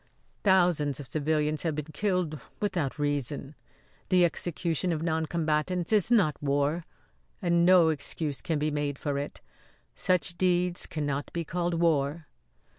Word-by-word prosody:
"Thousands 175 - +3
of 130 -4 -9
civilians 155 0 0
have 160 -3 -1
been 150 -1 -3
killed 180 -4 -1 0.2
without 175 -10 -1
reason. 145 -1 -2 0.6
The 180 -2 +5
execution 175 0 -1
of 160 -1 -2
noncombatants 160 +2 0
is 210 -1 +3
not 200 -11 +3
war, 145 +3 0 0.5
and 170 -1 +2
no 180 -3 +7
excuse 150 -1 -3
can 160 -3 -1
be 150 +1 0
made 145 -1 -2
for 140 -1 -2
it. 145 - -6 0.5
Such 180 -1 0
deeds 180 -1 +1
cannot 145 -2 -3
be 170 -1 -2
called 175 +1 -1
war." 160 -2 +1
160 Hz, 135 wpm, -28 LUFS, 145-175 Hz, 0.6 s, no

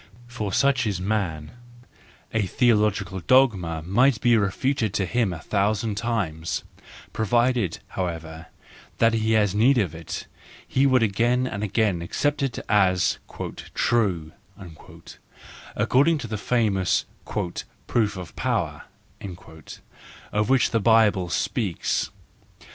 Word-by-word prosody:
For, 120 -5 -5
such 130 +1 +2
is 100 -4 -2
man: 90 -6 -2 0.8
a 110 -3 +1
theological 105 -5 +1
dogma 95 -8 +2
might 115 +7 +3
be 120 -2 +4
refuted 110 +2 0
to 95 - +1
him 110 +1 0
a 90 - -5
thousand 105 +3 0
times,—provided, 110 +2 -2 0.2
how¬ 90 -2 -1
ever, 80 0 -9 0.5
that 115 0 +3
he 110 0 +1
had 105 -3 +3
need 120 +6 +4
of 95 -9 0
it, 80 -1 -6 0.4
he 135 +1 +2
would 130 -3 +4
again 120 +5 +1
and 105 -5 -4
again 105 -3 0
accept 145 +12 -1
it 135 -3 -1
as 95 -3 +2
" - - -33 0.5
true/'—according 100 - -2
to 135 - -6
the 110 -1 -3
famous 105 -6 +1
" - - -33 0.6
proof 105 -4 0
of 90 -2 -9
power 95 - -2 0.7
" 80 - -16
of 105 +2 +1
which 135 -2 +3
the 115 - +2
Bible 105 -5 +3
speaks. 100 0 -1
105 Hz, 120 wpm, -24 LUFS, 95-120 Hz, 0.8 s, be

